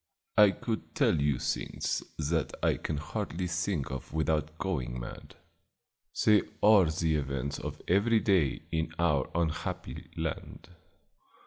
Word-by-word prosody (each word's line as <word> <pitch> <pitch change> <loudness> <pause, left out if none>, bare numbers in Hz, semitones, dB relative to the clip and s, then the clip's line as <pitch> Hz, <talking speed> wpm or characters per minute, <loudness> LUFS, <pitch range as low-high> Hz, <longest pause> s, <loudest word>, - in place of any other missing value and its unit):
I 105 -1 +8
could 110 +3 -4
tell 80 - +3
you 70 -2 +2
things - - -2 0.2
that 80 0 0
I - - +3
can 75 - -3
hardly 80 +3 -3
think 85 -4 -1
of 65 -2 -6
without 80 0 0
going 65 -11 -2
mad; - - -9 0.9
they 105 -1 +6 0.2
are 105 -3 +7
the 80 0 +1
events 70 -1 -3
of - - -6
every 105 +5 +4
day 95 -9 +2
in 80 0 -1
our 75 -6 +2
unhappy 85 -2 -3
land. - - -5
80 Hz, 130 wpm, -30 LUFS, 75-95 Hz, 0.9 s, I